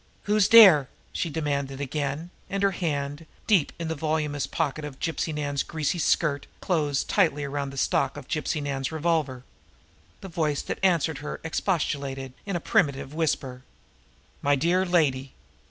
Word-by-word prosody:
"Who's 210 -1 +3
dere?" 185 - +8 0.2
she 170 - -2
demanded 140 -3 -2
again, 145 +4 -3 0.2
and 195 0 -2
her 200 - +4
hand, 150 -3 -3 0.2
deep 190 -9 +3
in 170 - -4
the 160 - -1
voluminous 150 -2 -1
pocket 155 -2 -2
of 145 -3 -7
Gypsy 165 0 -2
Nan's 145 -2 -2
greasy 160 +1 -2
skirt, 150 -3 +1
closed 150 -7 0
tightly 160 -8 +2
around 140 0 -3
the 135 - -10
stock 135 - +1
of 140 - -9
Gypsy 155 0 -2
Nan's 135 -1 -2
revolver. 155 -5 -1 0.8
The 195 - -7
voice 155 -5 -1
that - - -4
answered 165 -6 +2
her 150 - -6
expostulated 140 -6 -2
in 195 - -2
a - - 0
plaintive 140 -4 0
whisper: 135 -5 -1 0.8
"My 145 0 +3
dear 175 +6 +1
lady! 140 -7 +1
150 Hz, 155 wpm, -26 LUFS, 140-165 Hz, 0.8 s, dere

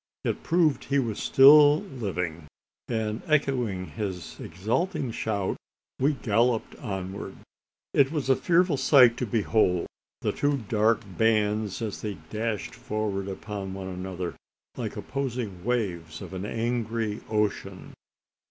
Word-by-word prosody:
It - - -1
proved 165 -3 +2
he 140 - +1
was 115 -6 -1
still 145 +2 +7
living; 90 - -4 0.4
and, 110 -1 -2
echoing 125 -11 +1
his 95 -4 -6
exulting 115 - -2
shout, 100 -4 -2 0.4
we 140 +4 +3
galloped 115 -1 +1
onward. 95 -2 -5 0.6
It 140 0 +4
was 150 -5 -2
a 135 - +5
fearful 175 -1 +2
sight 125 -4 +6
to 125 - -2
behold 105 -4 +2 0.4
the - - +1
two 145 0 +1
dark 110 0 +1 0.2
bands 110 -1 +1
as 105 -3 -4
they 105 -2 -3 0.2
dashed 110 -1 -2
forward 105 -2 -3
upon 100 -1 -5
one 95 -1 -5
another 90 -1 -4 0.4
like - - -4
opposing 120 -9 -4
waves 90 -10 -2
of 95 -3 -8
the 95 +2 -4
angry 115 -2 -2
ocean. 100 -3 -2
110 Hz, 125 wpm, -27 LUFS, 95-125 Hz, 0.6 s, still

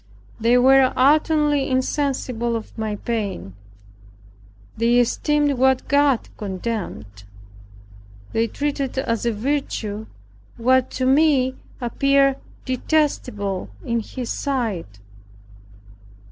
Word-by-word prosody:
They 235 +2 +4
were 265 +1 +5
utterly 295 +1 +3
insensible 255 -3 -1
of 225 - -6
my 220 -2 -3
pain. 200 - -4 1.2
They 235 +2 +2
esteemed 285 +3 +1
what 265 0 +2
God 280 -3 +2
condemned. 190 - -5 1.1
They 225 +1 +1
treated 280 +1 -3
as 230 -3 -1
a - - +2
virtue 220 -3 -3 0.5
what 255 +2 +3
to 255 - 0
me 270 -1 +3 0.3
appeared 275 +2 +2 0.3
detestable 250 - -1 0.2
in 235 0 0
His 240 +2 -5
sight. 215 - -3
255 Hz, 90 wpm, -22 LUFS, 225-275 Hz, 1.2 s, were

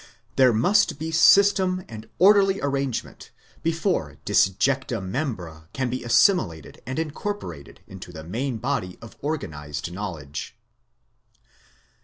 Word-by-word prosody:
There 130 -2 +5
must 145 - +2
be 160 +2 -4
system 190 +1 +4
and 110 -1 -10
orderly 195 0 +5
arrangement, 140 -3 -3 0.3
before 165 - -1
disjecta 125 +5 +2
membra 95 - -5
can 130 -2 -2
be 130 - -3
assimilated 115 - +2
and 130 - -4
incorporated 155 - -5
into 95 -2 -10
the 80 -2 -9
main 120 - -3
body 120 -7 -3
of 115 -1 -12
organised 80 - -4
knowledge. 85 -7 -6
125 Hz, 110 wpm, -24 LUFS, -, 0.3 s, There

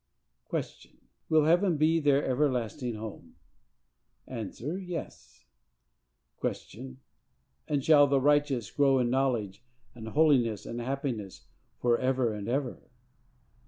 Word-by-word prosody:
Q. - - 0 0.7
Will 155 -1 +4
heaven 175 +1 +3
be 160 +2 +3
their 145 -2 +2
everlasting 125 -2 -1
home?—A. 65 - -11 0.3
Yes. 175 - -8 1.0
Q. 65 -1 -5 0.7
And 145 -3 0
shall 145 -2 +7
the 140 -1 +2
righteous 145 -5 +1
grow 135 -2 +3
in 120 -2 +1
knowledge 125 -6 -1 0.3
and 115 -2 -9
holiness 120 -7 +2
and 120 +1 -5
happiness 120 - -4 0.3
for 120 -1 +2
ever 130 -3 +1
and 105 -1 -6
ever? 130 0 -3
130 Hz, 105 wpm, -29 LUFS, 110-145 Hz, 1.0 s, shall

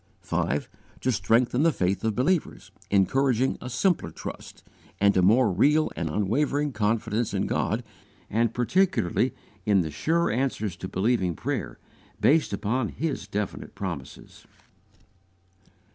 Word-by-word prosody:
5. 75 +2 -1 0.3
To 130 - +1
strengthen 120 +3 +2
the 165 +1 +4
faith 95 -6 -1
of 110 -2 0
believers, 155 +6 0 0.2
encouraging 130 +6 +2
a 125 - -6
simpler 180 +8 +1
trust, - - -9 0.4
and 100 0 +4
a 95 - +4
more 110 +4 +4
real 150 - +3
and 85 - -2
unwavering 140 - 0
confidence 110 0 0
in - - 0
God, - - -1 0.4
and 115 +1 +1
particularly 130 - +1 0.3
in 100 -2 +3
the 80 -2 -3
sure 165 - +1
answers 115 -7 -1
to 95 - -6
believing 95 -3 0
prayer, - - -3 0.4
based 155 +1 +3
upon 110 +4 -1
His 150 -10 -3
definite 100 -1 -4
promises. 85 -9 -7
115 Hz, 130 wpm, -26 LUFS, 100-135 Hz, 0.4 s, the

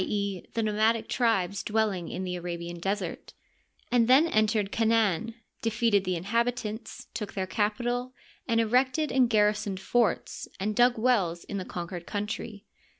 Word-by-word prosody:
e., 200 -2 -2
the 230 - +1
nomadic 220 +1 +1
tribes 200 -6 +1
dwelling 210 -5 0
in 185 - -4
the 180 -1 -3
Arabian 175 -1 -5
Desert 195 -1 -3 0.3
— - - -37
^and 235 -2 +4
then 265 +5 +6
entered 215 -7 +1
Canaan, 225 -1 +1 0.3
defeated 225 -3 +2
the 185 0 0
inhabitants, 225 +4 -2
took 210 -3 -5
their 190 -1 -2
capital, 240 +5 -1 0.3
and 230 -2 +2
erected 260 +7 +2
and 255 -2 +3
gar 210 -2 +4
risoned 205 -2 -4
forts 230 +4 0
and 210 +2 -1
dug 245 +1 +4
wells 205 -8 +1
in 200 - -5
the 185 - -5
conauered 175 0 -6
countiy. 210 0 -4
215 Hz, 150 wpm, -28 LUFS, 190-230 Hz, 0.3 s, then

